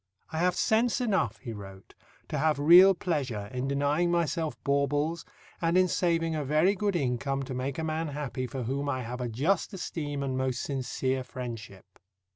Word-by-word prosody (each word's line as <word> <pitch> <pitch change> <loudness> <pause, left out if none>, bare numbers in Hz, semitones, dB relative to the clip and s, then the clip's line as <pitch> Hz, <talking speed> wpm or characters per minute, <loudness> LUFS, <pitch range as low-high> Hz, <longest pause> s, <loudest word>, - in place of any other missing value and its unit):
"I 160 - -2
have 180 +1 +2
sense 230 +5 +2
enough," 190 - 0
he 115 +2 -7
wrote, 95 -2 -11 0.4
"to 150 - -2
have 155 0 +2
real 175 +6 +8
pleasure 130 - -2
in 125 +1 -2
denying 145 +5 +1
myself 170 -2 0
baubles, 145 +4 0 0.4
and 170 +1 +2
in 185 0 +5
saving 165 -2 +1
a 150 - -1
very 155 +7 +3
good 205 -1 -1
income 135 -1 -1
to 130 - -6
make 130 +2 -3
a 160 - -2
man 160 +1 -1
happy 140 -3 -4
for 130 -1 -5
whom 140 +4 -2
I 130 -2 -1
have 125 +2 -5
a 120 - -2
just 160 - 0
esteem 145 -6 -4
and 130 -1 -2
most 130 -1 -1
sincere 130 -1 -2
friendship." 120 -6 -7
145 Hz, 180 wpm, -29 LUFS, 130-165 Hz, 0.4 s, real